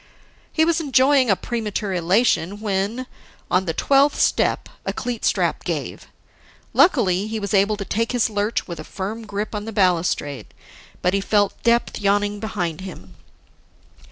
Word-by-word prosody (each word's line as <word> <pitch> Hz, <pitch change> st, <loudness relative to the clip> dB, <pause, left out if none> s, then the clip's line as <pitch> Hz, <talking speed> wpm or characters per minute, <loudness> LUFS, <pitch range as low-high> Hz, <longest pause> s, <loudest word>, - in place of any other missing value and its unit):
He 315 Hz, -, +3 dB
was 335 Hz, 0 st, +2 dB
enjoying 265 Hz, -2 st, +3 dB
a 195 Hz, -, +5 dB
premature 210 Hz, -3 st, -3 dB
elation 185 Hz, +1 st, +1 dB
when, 210 Hz, +4 st, -2 dB, 0.5 s
on 185 Hz, +1 st, +2 dB
the 165 Hz, -, -1 dB
twelfth 280 Hz, +1 st, +3 dB
step, -, -, +1 dB, 0.2 s
a -, -, -2 dB
cleat 245 Hz, -2 st, -4 dB
strap -, -, +1 dB
gave. -, -, -4 dB, 0.7 s
Luckily, 210 Hz, -, +3 dB
he 220 Hz, 0 st, -3 dB
was 200 Hz, -1 st, -4 dB
able 200 Hz, +1 st, +3 dB
to 200 Hz, -, -5 dB
take 230 Hz, +3 st, -1 dB
his 245 Hz, -2 st, +2 dB
lurch 210 Hz, 0 st, -1 dB
with 170 Hz, -2 st, -7 dB
a -, -, -6 dB
firm 215 Hz, +6 st, -6 dB
grip 210 Hz, +2 st, -4 dB
on 210 Hz, 0 st, -4 dB
the 225 Hz, -, -5 dB
balustrade; 175 Hz, -, 0 dB, 0.5 s
but 180 Hz, -, +2 dB
he 200 Hz, -, +1 dB
felt 205 Hz, 0 st, +1 dB
depth 235 Hz, 0 st, +1 dB
yawning 205 Hz, +1 st, +1 dB
behind 185 Hz, -7 st, -3 dB
him. 95 Hz, -, -10 dB
205 Hz, 155 wpm, -22 LUFS, 190-230 Hz, 0.7 s, a